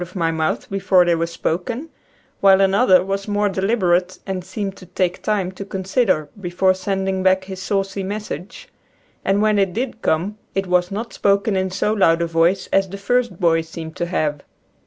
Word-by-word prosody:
of 180 +2 -12
my 165 -3 +1
mouth 160 -1 -1
before 190 -2 +3
they 175 - +3
were 165 0 0
spoken, 180 - -3 0.5
while 195 -1 +6
another 195 -1 +4
was 195 +1 -3
more 205 0 +1
deliberate 190 -3 +1
and 190 -2 -3
seemed 195 +1 -4
to 185 - -14
take 180 0 -1
time 200 -4 0
to 190 +1 -7
consider 190 - 0
before 185 0 +2
sending 190 0 -2
back 190 0 +3
his 190 -1 -8
saucy 195 +1 -1
message, 200 -2 -6 0.6
and 200 +2 +2
when 215 -1 +3
it 195 -2 +1
did 240 +1 -3
come 190 +7 0 0.2
it 195 0 0
was 180 -1 +2
not 220 +4 -5
spoken 200 +1 +1
in 190 0 0
so 200 +3 0
loud 165 -6 +3
a 170 - +1
voice 170 +3 +2
as 195 -1 +3
the 200 - -6
first 235 -1 0
boy 165 -2 +3
seemed 160 0 -8
to 175 - -2
have. 150 -5 -1
190 Hz, 185 wpm, -20 LUFS, 175-200 Hz, 0.6 s, while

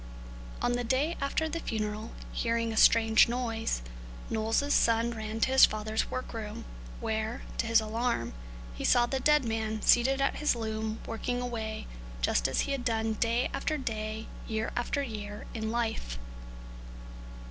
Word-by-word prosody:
On - - +2
the 245 0 0
day 270 +8 +1
after 280 +3 0
the 325 +2 -3
funeral, 215 -3 -3 0.2
hearing 230 -1 0
a - - -4
strange 225 +1 +6
noise, 225 - -1 0.5
Knowles' 225 +6 +1
son 230 0 +3
ran 220 -1 -4
to 260 - +3
his 265 - +9
father's 215 +1 -2
work 255 -1 -4
room, 225 0 -6 0.3
where, 220 0 -2 0.2
to 230 - +1
his 230 0 +5
alarm, 220 - -1 0.4
he - - -6
saw 240 -1 +5
the 265 +2 -2
dead 300 0 +4
man 220 -1 -2
seated 265 +3 +5
at 275 - +1
his 300 -4 +2
loom 220 -1 -3
working 245 +2 -2
away 225 -3 -4 0.3
just - - +2
as - - +1
he - - -2
had 275 -3 -1
done 225 -2 0
day 230 +3 +1
after 310 - -1
day, 220 -4 -3 0.2
year 220 -1 -2
after 260 +4 0
year, 210 -4 -6
in 220 -1 -3
life. 225 - -2
225 Hz, 160 wpm, -30 LUFS, 220-245 Hz, 0.5 s, his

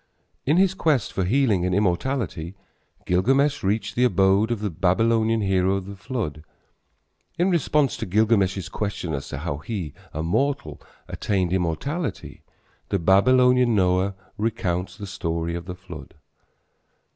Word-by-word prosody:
In 150 +4 +4
his 190 0 +4
quest 150 - 0
for 95 - -1
healing 110 -4 +2
and 90 0 0
immortality 95 - -1 0.5
Gilgamesh 135 +11 +2
reached 100 +1 -1
the 125 - +1
abode 95 -1 +3
of 120 -3 -1
the 105 -2 -2
Babylonian 110 +6 +2
hero 95 -1 +2
of 95 -1 -4
the 100 +1 -8
flood. 95 - -4 0.9
In 180 +2 +2
response 150 -4 +2
to - - -4
Gilgamesh's 100 -2 +2
question 95 -5 -4
as 70 0 -4
to - - -5
how 75 -1 -3
he, 85 -3 -5 0.2
a 80 - -4
mortal, 85 - -1 0.3
attained 95 -3 -1
immortality 95 - -3 0.5
the - - +1
Babylonian 125 +6 +4
Noah 95 0 +2 0.2
recounts 95 -4 -2
the 105 - -7
story 85 -3 -3
of 85 0 -5
the 90 0 -6
flood. 85 -6 -11
100 Hz, 140 wpm, -24 LUFS, 90-120 Hz, 0.9 s, In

